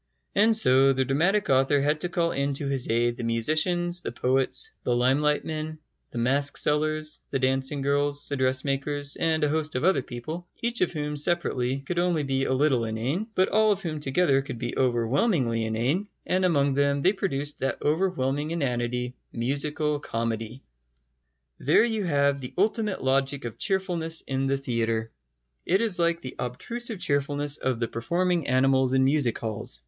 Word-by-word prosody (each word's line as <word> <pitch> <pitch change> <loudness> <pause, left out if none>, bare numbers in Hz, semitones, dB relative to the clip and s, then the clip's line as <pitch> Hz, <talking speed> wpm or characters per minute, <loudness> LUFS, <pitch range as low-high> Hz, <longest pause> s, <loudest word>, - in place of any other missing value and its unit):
And 220 +3 +4
so 135 -9 +5
the 130 0 0
dramatic 175 +10 +1
author 135 +2 +3
had 150 +2 +1
to 175 - -1
call 170 -2 0
in 140 0 -1
to 140 - -3
his 135 -2 -1
aid 120 +1 +1
the - - -5
musicians, 155 +10 +1
the - - -5
poets, 130 - +1
the 120 - +1
limelight 140 +5 +2
men, 155 0 -5 0.3
the - - -9
mask 135 +4 +1
sellers, 155 +1 +1
the 135 - -1
dancing 135 +2 0
girls, 145 +1 +1
the 140 - -2
dressmakers, 140 +2 0
and 160 -1 0
a 150 - +2
host 155 -1 -1
of 125 - -1
other 185 -5 +3
people, 155 +9 -7
each 235 +1 -2
of 180 - +2
whom 150 -2 -3
separately 140 -5 -1
could 175 +6 -3
only 175 -3 +1
be 135 -1 -1
a - - -1
little 130 -2 +2
inane, 120 - -2
but 185 0 +2
all 215 0 +3
of 195 -1 -1
whom 155 -3 -3
together 135 0 +2
could 135 -3 -7
be 120 +1 -4
overwhelmingly 120 - +1
inane; 125 - -1 0.2
and 185 +1 +1
among 140 -5 +2
them 140 0 +1
they 190 - +4
produced 145 -7 -3
that 135 - -1
overwhelming 150 -3 0
inanity, 125 -5 -2 0.2
musical 145 +4 -1
comedy. 115 -1 -4 1.0
There - - +4
you 220 -4 -2
have 140 -3 +1
the 125 - -8
ultimate 210 - 0
logic 135 0 +1
of 115 - -7
cheerfulness 175 -5 -1
in 135 0 -2
the 135 0 +1
theatre. 115 -4 -2 0.5
It 190 +3 +2
is 210 -6 +2
like 170 0 +1
the 130 - -7
obtrusive 220 - -4
cheerfulness 145 -1 0
of 130 -3 -2
the 115 - -1
performing 170 +8 -1
animals 130 0 +2
in 130 - +4
music 135 -3 +2
halls. 105 - -2
140 Hz, 175 wpm, -26 LUFS, 130-170 Hz, 1.0 s, so